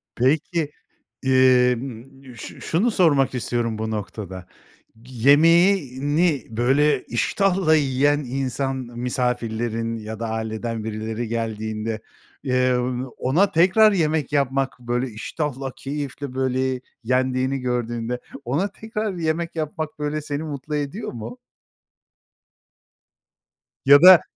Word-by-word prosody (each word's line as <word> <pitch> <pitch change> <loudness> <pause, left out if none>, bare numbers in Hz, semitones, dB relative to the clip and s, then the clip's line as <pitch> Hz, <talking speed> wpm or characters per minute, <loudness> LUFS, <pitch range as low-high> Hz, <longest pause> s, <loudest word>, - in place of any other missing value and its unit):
Peki, 150 +4 +1 0.5
emm, 130 0 +1
ş 115 - -9
şunu 205 +9 +1
sormak 145 -10 +3
istiyorum 120 -2 -1
bu 110 0 -3
noktada. 95 -3 -6 0.6
Yemeğini 145 - +3
böyle 135 +7 +2
iştahla 180 - +2
yiyen 145 0 +2
insan, 135 0 -2
misafirlerin 120 -2 -2
ya 110 0 -7
da 115 -1 -3
aileden 110 0 -3
birileri 110 +1 -4
geldiğinde, 110 -1 -3 0.4
eee, 130 -1 +2 0.4
ona 170 +11 +2
tekrar 190 +6 +5
yemek 155 -7 0
yapmak, 135 -2 0
böyle 120 +1 -2
iştahla, 135 +4 -4
keyifle 140 -1 -5
böyle 130 -1 0 0.2
yendiğini 130 +2 0
gördüğünde 120 -1 -2 0.3
ona 145 +11 0
tekrar 215 0 -4
yemek 165 -1 -2
yapmak 155 0 -4
böyle 150 +1 -2
seni 145 0 -4
mutlu 150 0 -5
ediyor 150 +9 -3
mu? 120 +1 -7 2.5
Ya 140 +1 +8
da, 185 -1 +10
130 Hz, 100 wpm, -23 LUFS, 120-150 Hz, 2.5 s, da